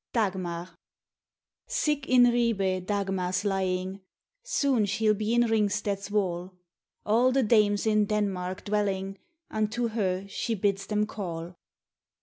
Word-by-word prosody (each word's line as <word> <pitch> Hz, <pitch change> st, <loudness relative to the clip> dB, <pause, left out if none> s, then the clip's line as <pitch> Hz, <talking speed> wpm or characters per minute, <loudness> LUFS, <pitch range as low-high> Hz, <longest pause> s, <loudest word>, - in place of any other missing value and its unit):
DAGMAR 180 Hz, -5 st, -2 dB, 0.9 s
Sick 300 Hz, -, -1 dB
in 250 Hz, -1 st, +7 dB
Ribe 210 Hz, -7 st, +2 dB
Dagmar's 195 Hz, -2 st, -1 dB
lying, 190 Hz, -1 st, -1 dB, 0.4 s
Soon 280 Hz, -, +1 dB
she'll 215 Hz, +1 st, +2 dB
be 215 Hz, +2 st, -1 dB
in 240 Hz, -, +5 dB
Ringsted's 205 Hz, -3 st, 0 dB
wall; 185 Hz, -3 st, -1 dB, 0.5 s
All 235 Hz, +4 st, +4 dB
the 270 Hz, 0 st, +2 dB
Dames 210 Hz, -2 st, +3 dB
in 215 Hz, -1 st, +3 dB
Denmark 195 Hz, -3 st, -2 dB
dwelling 195 Hz, -2 st, -1 dB, 0.3 s
Unto 220 Hz, +2 st, -1 dB
her 195 Hz, -4 st, -1 dB
she 225 Hz, +3 st, -2 dB
bids 195 Hz, -1 st, 0 dB
them 210 Hz, 0 st, +1 dB
call. 175 Hz, -5 st, -6 dB
205 Hz, 120 wpm, -28 LUFS, 190-220 Hz, 0.9 s, in